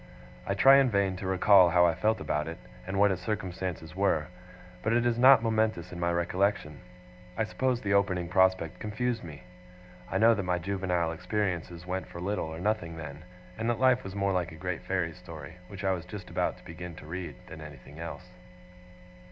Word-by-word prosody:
I -, -, 0 dB
try 135 Hz, +1 st, +7 dB
in 135 Hz, -2 st, +4 dB
vain 100 Hz, -3 st, +1 dB
to 95 Hz, -, -5 dB
recall 95 Hz, -1 st, +6 dB
how 90 Hz, 0 st, +5 dB
I 85 Hz, -, +3 dB
felt 110 Hz, +4 st, +1 dB
about 75 Hz, +2 st, -2 dB
it, 85 Hz, +1 st, -6 dB, 0.3 s
and 95 Hz, 0 st, -3 dB
what 100 Hz, 0 st, +5 dB
its 95 Hz, -1 st, -3 dB
circumstances 90 Hz, -5 st, -4 dB
were; 95 Hz, -5 st, +1 dB, 0.5 s
but 110 Hz, -, 0 dB
it 120 Hz, 0 st, +2 dB
is 120 Hz, -1 st, +1 dB
not 130 Hz, -2 st, +8 dB
momentous 110 Hz, -6 st, 0 dB
in 90 Hz, -, -7 dB
my 85 Hz, 0 st, +1 dB
recollection. 90 Hz, -2 st, 0 dB, 0.6 s
I 110 Hz, -, +2 dB
suppose 125 Hz, +2 st, -1 dB
the 100 Hz, -1 st, 0 dB
opening 95 Hz, -3 st, +2 dB
prospect 95 Hz, -2 st, +2 dB
confused 115 Hz, +3 st, -2 dB
me. 80 Hz, -2 st, -10 dB, 0.7 s
I -, -, 0 dB
know 115 Hz, +1 st, +6 dB
that 100 Hz, -, -1 dB
my 90 Hz, -1 st, 0 dB
juvenile 90 Hz, -2 st, -1 dB
experiences 90 Hz, -1 st, -3 dB
went 95 Hz, +1 st, -3 dB
for 85 Hz, -, -9 dB
little 100 Hz, -1 st, -2 dB
or 80 Hz, +1 st, -7 dB
nothing 85 Hz, -5 st, -1 dB
then; 75 Hz, 0 st, -8 dB, 0.4 s
and 115 Hz, +1 st, 0 dB
that 115 Hz, -1 st, 0 dB
life 130 Hz, -1 st, +4 dB
was 95 Hz, 0 st, -7 dB
more 100 Hz, -1 st, +1 dB
like 90 Hz, -3 st, -1 dB
a -, -, -10 dB
great 90 Hz, +1 st, -4 dB
fairy 90 Hz, -3 st, -1 dB
story, 80 Hz, -3 st, -10 dB
which 100 Hz, +1 st, -9 dB
I 95 Hz, -, +2 dB
was 90 Hz, -3 st, -2 dB
just 95 Hz, +2 st, -9 dB
about -, -, -1 dB
to -, -, -19 dB
begin 85 Hz, +1 st, -8 dB
to -, -, -12 dB
read, 85 Hz, -1 st, -6 dB
than 80 Hz, -, -10 dB
anything 75 Hz, 0 st, -11 dB
else. 85 Hz, +2 st, -7 dB
95 Hz, 200 wpm, -29 LUFS, 85-105 Hz, 0.7 s, not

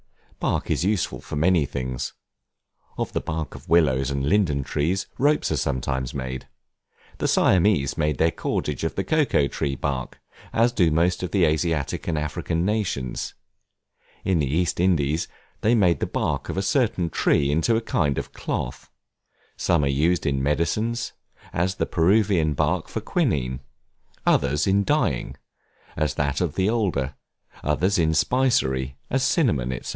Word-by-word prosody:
Bark -, -, -1 dB
is -, -, +1 dB
useful 100 Hz, -1 st, 0 dB
for -, -, -7 dB
many 80 Hz, -1 st, +3 dB
things: 65 Hz, -1 st, -4 dB, 0.8 s
of -, -, -3 dB
the -, -, 0 dB
bark 80 Hz, 0 st, -4 dB
of -, -, -12 dB
willows 70 Hz, -6 st, +3 dB
and 70 Hz, -1 st, -1 dB
linden 80 Hz, -8 st, +2 dB
trees, 85 Hz, +9 st, -1 dB
ropes 150 Hz, +2 st, +2 dB
are -, -, +1 dB
sometimes 65 Hz, 0 st, -2 dB
made. 65 Hz, -1 st, -5 dB, 0.7 s
The -, -, 0 dB
Siamese 90 Hz, -7 st, +3 dB
make 75 Hz, -3 st, +1 dB
their 80 Hz, +4 st, +3 dB
cordage 75 Hz, -3 st, -2 dB
of 80 Hz, -, -2 dB
the 95 Hz, -, -1 dB
cocoa 145 Hz, -, +2 dB
tree 70 Hz, -1 st, -2 dB
bark, 65 Hz, -1 st, -3 dB, 0.3 s
as 115 Hz, +2 st, +3 dB
do 90 Hz, -8 st, +3 dB
most 85 Hz, +3 st, +1 dB
of 90 Hz, -, -2 dB
the 90 Hz, +1 st, +3 dB
Asiatic 80 Hz, -1 st, -1 dB
and 80 Hz, -, 0 dB
African 75 Hz, +3 st, -2 dB
nations; 95 Hz, -, -2 dB, 0.9 s
in 95 Hz, -3 st, +2 dB
the 70 Hz, -, +1 dB
East 85 Hz, +6 st, 0 dB
Indies, 80 Hz, -4 st, +2 dB, 0.3 s
they 115 Hz, +3 st, +3 dB
make 90 Hz, -6 st, +3 dB
the -, -, -1 dB
bark -, -, -2 dB
of -, -, -3 dB
a 95 Hz, -, 0 dB
certain 100 Hz, -, +1 dB
tree 70 Hz, -1 st, +2 dB
into 80 Hz, +10 st, +2 dB
a 115 Hz, -, +1 dB
kind 75 Hz, -, 0 dB
of -, -, -4 dB
cloth; -, -, -4 dB, 0.7 s
some 85 Hz, -4 st, +1 dB
are -, -, +2 dB
used 80 Hz, +6 st, +1 dB
in 70 Hz, -1 st, +1 dB
medicines, 105 Hz, -, 0 dB, 0.4 s
as 90 Hz, +2 st, 0 dB
the -, -, 0 dB
Peruvian 90 Hz, -3 st, +2 dB
bark -, -, 0 dB
for -, -, -4 dB
Quinine; 65 Hz, -2 st, 0 dB, 0.7 s
others 70 Hz, +2 st, +2 dB
in 100 Hz, +1 st, +3 dB
dyeing, 105 Hz, -, 0 dB, 0.6 s
as 75 Hz, -2 st, -1 dB
that 70 Hz, -1 st, 0 dB
of -, -, -1 dB
the 95 Hz, -, +1 dB
alder; 90 Hz, -, 0 dB, 0.5 s
others 90 Hz, +7 st, +1 dB
in 80 Hz, -1 st, +2 dB
spicery, 65 Hz, -, +1 dB
as 135 Hz, -, +1 dB
cinnamon, 105 Hz, -, +2 dB
&c. -, -, -6 dB
80 Hz, 160 wpm, -24 LUFS, 70-95 Hz, 0.9 s, many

